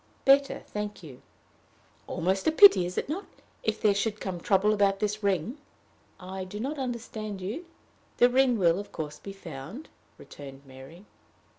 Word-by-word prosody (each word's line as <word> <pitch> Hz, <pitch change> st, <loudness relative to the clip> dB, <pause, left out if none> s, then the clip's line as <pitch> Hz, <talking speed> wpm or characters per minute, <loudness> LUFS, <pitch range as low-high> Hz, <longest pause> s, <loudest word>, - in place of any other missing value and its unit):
"Better, 275 Hz, +1 st, +4 dB
thank 210 Hz, -2 st, -5 dB
you." 135 Hz, -6 st, -11 dB, 0.9 s
"Almost 190 Hz, -, -1 dB
a -, -, +5 dB
pity, 315 Hz, -, +8 dB
is 180 Hz, -, -7 dB
it -, -, -1 dB
not 335 Hz, +8 st, -4 dB, 0.3 s
if 220 Hz, -1 st, -1 dB
there 210 Hz, -2 st, +4 dB
should 210 Hz, +1 st, -1 dB
come 185 Hz, -3 st, -4 dB
trouble 200 Hz, +4 st, +3 dB
about 200 Hz, -1 st, +2 dB
this 210 Hz, 0 st, -1 dB
ring?" 200 Hz, -, -1 dB, 0.6 s
"I 190 Hz, +1 st, -6 dB
do 185 Hz, +3 st, -7 dB
not 280 Hz, +6 st, -3 dB
understand 220 Hz, -5 st, -4 dB
you. 225 Hz, -, -5 dB, 0.5 s
The 245 Hz, -, +7 dB
ring 250 Hz, -1 st, +3 dB
will, 175 Hz, -2 st, +3 dB
of 205 Hz, -, -8 dB
course, 150 Hz, -1 st, -6 dB
be 200 Hz, -, -8 dB
found," 180 Hz, -, -9 dB, 0.3 s
returned 140 Hz, -1 st, -11 dB
Mary. 135 Hz, +8 st, -13 dB
200 Hz, 160 wpm, -28 LUFS, 180-230 Hz, 0.9 s, pity